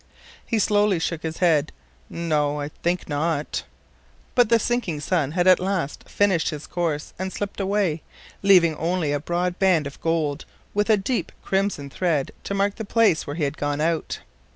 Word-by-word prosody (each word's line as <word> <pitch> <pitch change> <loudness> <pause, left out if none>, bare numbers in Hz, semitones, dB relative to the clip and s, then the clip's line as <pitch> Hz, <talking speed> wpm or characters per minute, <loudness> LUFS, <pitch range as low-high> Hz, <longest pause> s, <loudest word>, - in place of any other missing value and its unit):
He 230 - -1
slowly 205 -2 +3
shook 165 -1 -2
his 160 -1 -4
head: 160 - +3 0.4
"No, 150 -3 0
I 145 0 -3
think 175 +3 -2
not." 150 0 -1 0.7
But 245 -3 +4
the 230 - +6
sinking 230 -9 -1
sun 150 -1 0
had 175 0 +1
at 185 -1 +7
last 185 -6 -3
finished 195 -5 +2
his 150 -1 -6
course 160 -4 -2
and 190 0 -3
slipped 205 +1 -5
away, 195 -5 0 0.4
leaving 180 -5 +5
only 170 -2 0
a 145 - 0
broad 175 +3 -2
band 185 -6 +3
of 140 - -8
gold, 160 -2 0 0.3
with 205 +2 +1
a 215 - +6
deep 230 +5 -2
crimson 190 -8 -1
thread 160 -6 0
to 200 - -2
mark 200 0 +1
the 220 - -4
place 220 -5 +2
where 145 - -4
he 160 - -2
had 140 +1 -1
gone 145 0 -1
out. 160 +1 0
170 Hz, 175 wpm, -24 LUFS, 150-195 Hz, 0.7 s, at